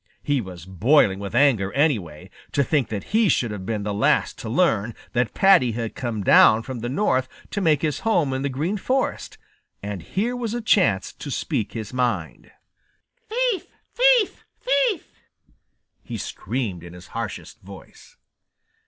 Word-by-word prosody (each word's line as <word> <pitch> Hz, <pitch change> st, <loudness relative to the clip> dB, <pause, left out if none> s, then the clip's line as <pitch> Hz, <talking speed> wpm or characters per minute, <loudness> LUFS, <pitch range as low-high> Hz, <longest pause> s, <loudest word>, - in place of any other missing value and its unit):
He 145 Hz, -3 st, +1 dB
was 90 Hz, -4 st, -10 dB
boiling 95 Hz, -, +3 dB
with 100 Hz, +2 st, -6 dB
anger, 120 Hz, -8 st, +3 dB
anyway, 110 Hz, -, -1 dB, 0.2 s
to 140 Hz, -, +3 dB
think 140 Hz, -2 st, +1 dB
that 105 Hz, -, -6 dB
he 220 Hz, -2 st, +4 dB
should 120 Hz, -8 st, +1 dB
have 95 Hz, -2 st, -7 dB
been 110 Hz, -2 st, -2 dB
the 105 Hz, 0 st, -2 dB
last 105 Hz, -, +1 dB
to 110 Hz, -, -6 dB
learn 115 Hz, -, +1 dB, 0.2 s
that 125 Hz, -2 st, 0 dB
Paddy 165 Hz, -12 st, +5 dB
had 115 Hz, -1 st, -4 dB
come 115 Hz, -5 st, -4 dB
down 110 Hz, +3 st, +6 dB
from 130 Hz, -1 st, -6 dB
the 120 Hz, +2 st, -4 dB
North 130 Hz, -4 st, +1 dB, 0.2 s
to 205 Hz, -, -2 dB
make 155 Hz, -5 st, +2 dB
his 150 Hz, -3 st, 0 dB
home 170 Hz, -12 st, +1 dB
in 130 Hz, -, -2 dB
the 140 Hz, -, -1 dB
Green 155 Hz, +10 st, -2 dB
Forest, 260 Hz, +6 st, -2 dB, 0.5 s
and 100 Hz, -3 st, -5 dB
here 220 Hz, -, -2 dB
was 235 Hz, -2 st, -3 dB
a -, -, -1 dB
chance 180 Hz, -, +2 dB
to -, -, -8 dB
speak 105 Hz, -2 st, -2 dB
his 110 Hz, 0 st, -6 dB
mind. 120 Hz, -10 st, -2 dB, 0.8 s
"Thief! 475 Hz, -3 st, 0 dB, 0.3 s
thief! -, -, +3 dB, 0.2 s
thief!" -, -, +1 dB, 0.9 s
he -, -, -6 dB
screamed 105 Hz, -10 st, -4 dB
in 85 Hz, 0 st, -10 dB
his 90 Hz, +1 st, -13 dB
harshest 115 Hz, 0 st, -6 dB
voice. 95 Hz, 0 st, -14 dB
125 Hz, 160 wpm, -23 LUFS, -, 0.9 s, down